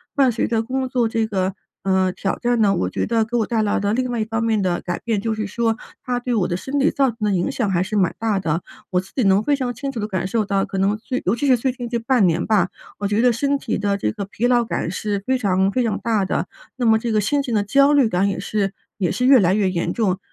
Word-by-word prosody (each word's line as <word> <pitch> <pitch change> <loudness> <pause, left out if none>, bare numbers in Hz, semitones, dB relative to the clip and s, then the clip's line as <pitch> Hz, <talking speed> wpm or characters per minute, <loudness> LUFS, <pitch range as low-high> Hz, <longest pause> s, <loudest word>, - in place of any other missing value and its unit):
伴 270 -3 +4
随 230 - 0
着 225 -1 +1
工 260 +2 -2
作 245 -3 +1
这 225 0 0
个， 190 -2 -1 0.3
呃， 190 -1 +2
挑 195 +1 -3
战 240 -1 +1
呢， 200 -3 +3
我 90 - -1
觉 - - -2
得 225 -1 +1
给 240 +2 -2
我 220 - +1
带 225 -2 0
来 205 - +1
的 205 +1 0
另 255 +1 -1
外 235 - -2
一 215 - 0
方 225 0 -2
面 220 -3 +1
的 180 -2 0
改 175 -1 -4
变， 220 -4 -1
就 225 0 -1
是 215 -1 -3
说 225 +2 0 0.3
它 245 -1 -1
对 245 -1 -2
我 190 -5 +2
的 175 - -1
身 270 +8 -4
体 280 +2 +3
造 275 -1 +2
成 230 - -8
的 210 -1 +1
影 180 -2 0
响 220 -6 -1
还 175 -1 +1
是 210 +3 -3
蛮 190 -3 +2
大 220 -3 0
的， 165 -2 -1 0.3
我 180 - +1
自 190 - -9
己 255 - +1
能 195 +1 +4
非 285 +5 +1
常 250 -3 -2
清 275 +4 -5
楚 230 - -4
地 210 - -2
感 185 -1 -2
受 225 +1 0
到， 195 -1 0
可 195 - -5
能 200 +2 +1
最 255 +3 -4
尤 190 - +2
其 285 - 0
是 255 - +6
最 255 +2 0
近 245 -1 -6
这 235 0 -1
半 230 -4 +2
年 170 +1 0
吧， 200 -5 +3 0.3
我 200 - -2
觉 210 +3 +1
得 250 -1 +5
身 280 +5 0
体 260 - -3
的 200 0 0
这 105 - -1
个 200 - -5
疲 210 +4 -3
劳 240 -2 +3
感 170 - -2
是 200 0 -3
非 260 0 +1
常 195 -3 +1
非 250 +1 0
常 220 - 0
大 215 -4 0
的， - - -1 0.3
那 250 -2 -2
么 220 -1 +5
这 230 -1 -2
个 210 - +3
心 280 +8 +1
情 245 -5 -2
的 205 - +2
焦 275 +7 +4
虑 270 -6 +4
感 185 +1 +1
也 195 - -2
是 195 +1 -2 0.2
也 180 -5 0
是 250 - -1
越 265 -2 +7
来 185 -1 +3
越 200 -2 +2
严 170 -1 -1
重。 195 -6 0
220 Hz, 315 characters per minute, -21 LUFS, 195-245 Hz, 0.3 s, 越